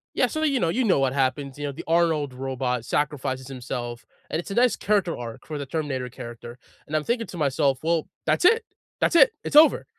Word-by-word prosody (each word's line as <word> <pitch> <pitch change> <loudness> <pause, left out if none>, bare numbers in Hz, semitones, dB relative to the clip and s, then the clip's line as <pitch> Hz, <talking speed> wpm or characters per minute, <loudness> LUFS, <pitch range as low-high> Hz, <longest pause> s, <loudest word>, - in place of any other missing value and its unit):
Yeah - - +3
so, 310 0 -3
you 280 -4 +2
know 170 - +1
you 250 +10 +1
know 200 - +3
what 135 -1 +1
happens, 135 0 -1
you 145 - -4
know, 145 - -2
the 140 - -8
Arnold 160 -4 +2
robot 130 -2 -2
sacrifices 130 -3 -2
himself, 120 -2 -6 0.2
and 160 - -1
it's 175 - -7
a - - -3
nice 245 0 +4
character 200 -5 0
arc 115 -2 -8
for 155 - -5
the 140 - -4
Terminator 135 -4 -3
character 120 0 -9 0.3
and 155 - -4
I'm 155 - +1
thinking 235 +5 -1
to 180 - -8
myself, 140 -2 +1
"Well, 165 -1 +1 0.2
that's - - +2
it. 455 +3 +5 0.4
That's - - +1
it. - - +7
It's - - -4
over. 310 +1 +7
145 Hz, 220 wpm, -25 LUFS, 130-175 Hz, 0.4 s, it